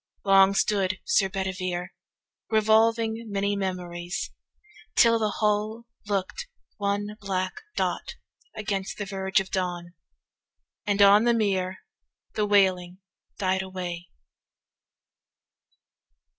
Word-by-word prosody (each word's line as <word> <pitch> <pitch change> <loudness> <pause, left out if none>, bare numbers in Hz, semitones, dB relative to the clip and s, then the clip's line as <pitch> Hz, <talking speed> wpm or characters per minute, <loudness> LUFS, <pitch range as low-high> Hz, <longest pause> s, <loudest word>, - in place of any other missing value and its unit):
Long 195 0 +6
stood 195 -2 +1
Sir 460 - +2
Bedivere 185 -2 -3 0.6
Revolving 225 +1 +2
many 200 0 0
memories, 180 -2 -4 0.6
till 230 -1 +5
the 215 -1 +1
hull 215 +2 -1 0.2
270 - - -11
Look'd 200 - -2 0.3
one 205 +1 -2
black 185 -2 -2 0.2
dot - - -2 0.4
against 200 -2 -3
the 205 - -3
verge 190 -1 0
of 190 0 -5
dawn, 175 -2 -3 0.9
And 200 0 +4
on 205 +3 +7
the 240 -1 +4
mere 190 -4 0 0.5
the 210 -1 0
wailing 185 -3 +2 0.4
died 190 -1 +1
away. 180 -2 -6
195 Hz, 105 wpm, -26 LUFS, 185-210 Hz, 0.9 s, on